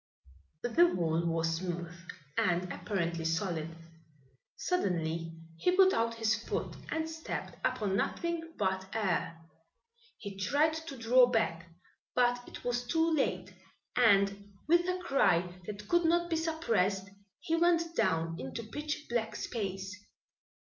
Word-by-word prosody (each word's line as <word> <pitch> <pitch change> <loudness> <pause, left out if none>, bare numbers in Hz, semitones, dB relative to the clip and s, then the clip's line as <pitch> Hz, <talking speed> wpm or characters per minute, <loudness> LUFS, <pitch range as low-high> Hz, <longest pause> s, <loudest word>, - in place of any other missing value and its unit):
The 330 +9 +5
wall 170 -1 +1
was 165 0 0
smooth 175 -1 -4 0.4
and 180 0 +1
apparently 170 -4 -2
solid. 165 -1 -1 0.9
Suddenly 165 - -1 0.3
he 360 +1 +2
put 380 -1 +7
out 230 0 +1
his 225 -1 +2
foot - - -3
and 320 0 -1
stepped 320 0 -6
upon 200 -2 0
nothing 335 +7 -2
but 190 -1 0
air. 185 -5 0 0.8
He 200 -2 -8
tried 290 +10 +3
to 320 -3 -6
draw 245 +2 +6
back, 170 -8 0 0.5
but 245 0 +3
it - - -10
was 245 0 -1
too 325 +4 +2
late, 190 -10 0 0.4
and 200 -3 +3 0.2
with 345 +2 +4
a 365 - 0
cry 180 - +2
that 210 0 -7
could 345 -1 +3
not 345 +1 +2
be - - +3
suppressed 230 - 0 0.3
he 330 - 0
went 335 0 +2
down 165 - +1
into 135 - -5
pitch 295 +6 -4
black 235 -2 -1
space. 195 -3 -4
215 Hz, 130 wpm, -32 LUFS, -, 0.9 s, put